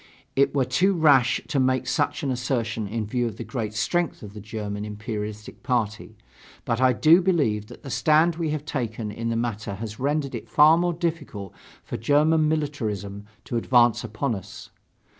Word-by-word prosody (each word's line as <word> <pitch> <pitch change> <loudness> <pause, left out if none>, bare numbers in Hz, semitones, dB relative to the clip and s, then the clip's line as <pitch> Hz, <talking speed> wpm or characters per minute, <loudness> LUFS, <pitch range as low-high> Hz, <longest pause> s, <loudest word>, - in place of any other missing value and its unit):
It 140 +1 +2
were 135 -2 +2
too 180 +11 +2
rash 140 -7 +4
to 140 - +1
make 130 -1 +1
such 145 +2 -1
an 135 - 0
assertion 115 -4 -2
in 110 +1 -3
view 120 +3 -1
of 115 - -7
the - - -5
great 110 -5 -4
strength 150 - -1
of 100 -1 -9
the 105 - -8
German 105 -1 -5
imperialistic 105 0 -6
party. 115 -5 -2 0.5
But 115 +2 -1
I 130 0 +5
do 160 +8 +5
believe 140 - +1
that 120 - -13
the 135 - -7
stand 160 +4 +3
we 165 -2 -1
have 150 -1 -3
taken 115 -7 -3
in 115 +2 -4
the 115 - -1
matter 110 -3 -3
has 110 +1 -7
rendered 140 +1 -1
it - - -7
far 155 +2 +6
more 175 +1 +1
difficult 145 - -4 0.3
for - - -5
German 150 +6 +3
militarism 105 -10 -3 0.2
to 120 - -3
advance 120 -1 +3
upon 115 +3 -2
us. 95 -4 -9
120 Hz, 180 wpm, -25 LUFS, 110-150 Hz, 0.5 s, far